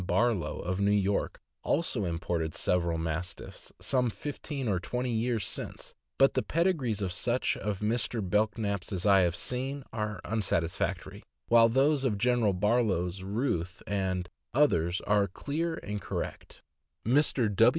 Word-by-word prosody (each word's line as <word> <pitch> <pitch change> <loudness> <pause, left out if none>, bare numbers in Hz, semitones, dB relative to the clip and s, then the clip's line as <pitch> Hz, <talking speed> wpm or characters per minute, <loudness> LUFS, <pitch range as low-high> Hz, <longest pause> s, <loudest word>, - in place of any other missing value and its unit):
Barlow, 95 -4 +1
of 90 +2 -2
New 100 0 +3
York, 100 -1 +1 0.2
also 125 - 0
imported 85 -1 -2
several 85 -2 +1
Mastiffs 80 +2 -5
some 125 -2 +1
fifteen 140 +1 -5
or 95 -4 +1
twenty 125 +6 -2
years 115 -2 0
since; - - -5 0.2
but 135 0 +5
the - - +1
pedigrees 150 - 0
of 95 - -1
such 120 +7 0
of 105 -2 -3
Mr. 110 -1 0
Belknap' 105 0 +1
s - - -8
as 95 -1 -2
I 100 -2 +6
have 90 -2 +2
seen 130 +6 -3
are 105 -3 -3
unsatisfactory, 90 -6 -1 0.3
while 115 -1 +7
those 135 +3 +3
of 115 -6 +1
General 120 -2 +2
Barlow's 95 -3 +1
Ruth 95 -4 -2
and 95 -3 -1 0.3
others 90 - +3
are 105 -1 +2
clear 160 - -2
and 105 0 -4
correct. - - -5 0.4
Mr. 125 -4 +3
105 Hz, 140 wpm, -30 LUFS, 90-125 Hz, 0.4 s, while